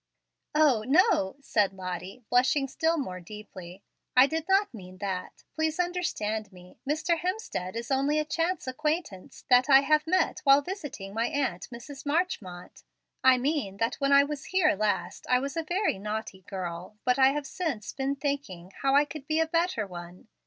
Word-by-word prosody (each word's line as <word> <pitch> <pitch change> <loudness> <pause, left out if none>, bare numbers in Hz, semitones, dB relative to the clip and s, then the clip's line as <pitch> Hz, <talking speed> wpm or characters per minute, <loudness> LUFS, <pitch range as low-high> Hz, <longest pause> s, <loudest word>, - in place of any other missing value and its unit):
"O, 285 -8 +4
no," 300 - +3
said 210 -7 +1
Lottie, 185 +4 -6
blushing 260 +3 +3
still 325 +5 0
more 185 -11 -4
deeply; 190 -1 -11 0.3
"I 255 - +9
did 320 +2 -3
not 390 -2 +3
mean 185 -4 -11
that. 185 -2 -5
Please 315 +1 -1
understand 220 - -2
me. 180 -1 -16
Mr. 320 +2 +1
Hemstead 355 - -3
is 235 +3 -5
only 275 +3 +2
a 305 - +1
chance 335 +4 -1
acquaintance 300 - -3
that 250 +2 +6
I 270 -1 +8
have 305 +2 +2
met 370 +2 +1
while 275 0 +6
visiting 290 - -6
my 230 +2 0
aunt, 260 -11 -2
Mrs. 250 +4 -9
Marchmont. 285 - -3 0.4
I 260 -1 +7
mean 255 -7 -1
that 230 +4 -1
when 275 0 +2
I 280 0 +7
was 290 -1 -5
here 365 -4 +3
last 210 +1 -2
I 250 - +5
was 275 +4 -3
a 330 - 0
very 350 - -1
naughty 210 -2 -5
girl, 185 +1 -6
but 250 +1 +2
I 265 - +7
have 295 -1 -3
since 275 - -4
been 275 +1 -1
thinking 275 - -4
how 275 0 +3
I 290 +1 +5
could 290 -1 -9
be 310 +1 +1
a 320 - +3
better 330 - 0
one. 180 +3 -10
270 Hz, 175 wpm, -28 LUFS, 200-310 Hz, 0.4 s, I